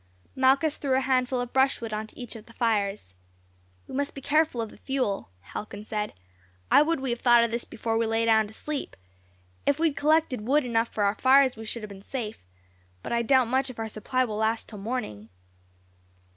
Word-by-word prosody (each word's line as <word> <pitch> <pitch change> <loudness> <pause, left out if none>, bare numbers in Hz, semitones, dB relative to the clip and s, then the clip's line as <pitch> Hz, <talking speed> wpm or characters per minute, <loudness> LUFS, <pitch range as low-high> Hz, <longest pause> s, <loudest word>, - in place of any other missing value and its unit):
Malchus 270 +4 +3
threw 270 -3 0
a - - +4
handful 255 -1 +1
of 245 0 -4
brushwood 265 -4 +1
on 215 +1 -3
to - - -17
each 245 -2 -6
of 220 -1 -11
the 230 - -15
fires. 205 - -1 0.7
"We - - -11
must 280 +1 -2
be - - -5
careful 300 -2 +2
of 225 -2 -3
the - - -15
fuel," 255 - -2
Halcon 205 - -7
said. 210 - -3 0.6
"I - - +8
would 325 +1 +1
we 265 -2 -2
had 235 - -2
thought 240 -1 +6
of 235 - 0
this 235 +1 -2
before 225 0 -2
we 230 - +1
lay 225 +1 +1
down 220 -1 +4
to 210 - -13
sleep. 295 +4 -5 0.7
If 285 - +3
we 325 +1 +3
had 285 - -9
collected 300 -4 +2
wood 275 +6 +2
enough 230 -1 +1
for 210 - -1
our 200 0 +3
fires 265 +2 +5
we 225 0 -8
should 225 +1 -6
have 215 - -6
been 195 -1 -10
safe; 220 - -5 0.6
but - - -3
I 235 - +2
doubt 255 +1 +4
much 260 +3 +1
if 255 - -9
our 225 0 -3
supply 255 +5 -1
will 215 -3 -4
last 220 +1 0
till 210 - -9
morning." 195 - -4
235 Hz, 215 wpm, -27 LUFS, 220-265 Hz, 0.7 s, I